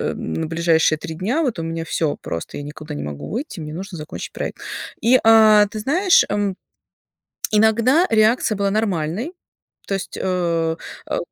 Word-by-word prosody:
ближайшие 160 - +1
3 160 +1 -7
дня, 225 - 0
вот 255 - -1
у - - -3
меня 165 0 -3
всё 155 -2 -1
просто, 85 - -5
я 145 - -6
никуда 150 +1 -8
не - - -4
могу 75 -1 -6
выйти, 235 - -5
мне 150 -1 -6
нужно 185 +2 -6
закончить 150 0 -7
проект. - - -5 0.4
И, 240 +3 +5
э, 220 -2 +7
ты 215 - -5
знаешь, 345 - +4
м, 205 -2 0 1.0
иногда 230 - +4
реакция 220 0 +3
была 200 0 0
нормальной. 205 - -1 0.5
То 195 - -2
есть, 195 - -5
э, 170 -3 0 0.3
э - - 0
195 Hz, 160 wpm, -21 LUFS, 160-220 Hz, 1.0 s, э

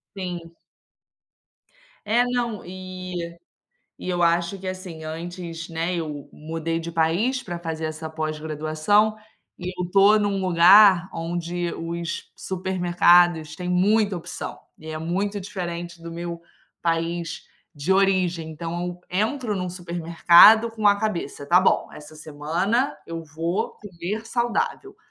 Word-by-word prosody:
Sim. 175 -3 -6 1.5
É, 235 +4 +3
não, 240 -4 -2
e 185 -2 -7 0.6
e - - -8
eu 175 -1 +1
acho 170 +3 +1
que, 190 - -9
assim, 185 -4 -6
antes, 165 +1 -6
né, 165 +2 -2
eu 150 -4 -5
mudei 165 +1 -3
de 170 +1 -6
país 175 +11 +1
para 175 -2 -5
fazer 160 -1 -4
essa 155 0 -5
pós-graduação 155 +6 0 0.4
e 180 0 -6
eu 180 - -1
estou 195 +4 +5
em 210 - +2
um 195 -1 -1
lugar 185 +1 +7
onde 170 +1 -3
os 170 +1 -4
supermercados 175 -3 +2
têm 180 0 -5
muita 200 +2 +2
opção 170 - -6 0.2
e 160 - -12
é 155 0 -4
muito 195 +5 -2
diferente 175 -3 -6
do 170 - -7
meu 170 0 -6 0.4
país 165 0 -2 0.3
de 155 +3 -1
origem. 185 -4 +2
Então 165 +2 -5
eu 180 0 -6
entro 215 +4 -1
em 190 - -3
um 180 -1 -3
supermercado 175 +5 +5
com 215 -2 +3
a 200 0 +4
cabeça, 170 -9 -3
"Tá 180 +3 +5
bom, 190 - +2
essa 150 +1 -12
semana 165 - -1
eu 165 0 -5
vou 165 +4 -3
comer 205 +3 -5
saudável". 240 - -2
175 Hz, 135 wpm, -24 LUFS, 165-195 Hz, 1.5 s, lugar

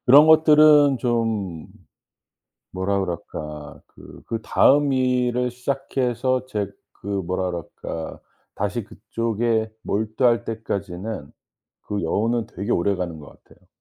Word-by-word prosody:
그런 145 +5 +8
것들은 150 -3 +6
좀 110 - -1 1.1
뭐라 95 +1 -1
그럴까 75 -4 -6
그 - - -14
그다음 135 +5 +3
일을 125 -1 +1
시작해서 130 0 -1
제 105 -6 -2 0.3
그 - - -10
뭐라 95 -2 -1
그럴까 80 -1 -6 0.4
다시 105 +3 -2
그쪽에 115 0 -1
몰두할 110 +3 +1
때까지는 100 -6 -5 0.5
그 105 -2 -3
여운은 110 +7 0
되게 100 +6 -3
오래가는 90 -3 -1
것 70 - -15
같아요. - - -23
110 Hz, 235 characters per minute, -23 LUFS, 95-125 Hz, 1.1 s, 그런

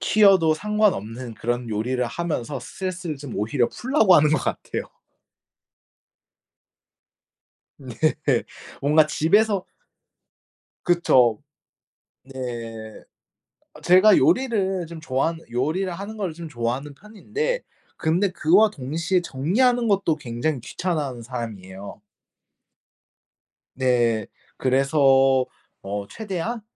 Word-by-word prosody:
튀어도 190 -7 +4
상관없는 130 - -1
그런 120 +1 -3
요리를 125 +4 -1
하면서 150 -1 -3
스트레스를 180 -1 -5
좀 140 -3 -9
오히려 120 +4 0
풀려고 240 -8 +3
하는 150 -1 +5
것 155 - +3
같아요. - - -3 3.0
네. 130 -4 -10 0.9
뭔가 150 +2 +4
집에서 195 +6 +2 1.2
그쵸. 130 -10 +3 0.8
네. 135 -1 -12 1.4
아 - - -13
제가 185 +3 +6
요리를 195 -9 +1
좀 165 -1 -9
좋아하는 160 +3 -1
요리를 155 +10 -1
하는 200 +5 -7
거를 190 -6 -3
좀 170 0 -8
좋아하는 130 +2 -3
편인데 410 - -4 0.3
근데 175 +5 +1
그와 185 +7 +4
동시에 165 +4 -1
정리하는 235 - +1
것도 195 -6 +2
굉장히 130 +2 -3
귀찮아하는 145 -4 -3
사람이에요. 105 -5 -7 1.7
네. 120 -5 +1 0.3
그래서 135 -1 +3 0.4
어 100 +1 -5
최대한 220 - -4
155 Hz, 230 characters per minute, -23 LUFS, 125-190 Hz, 3.0 s, 제가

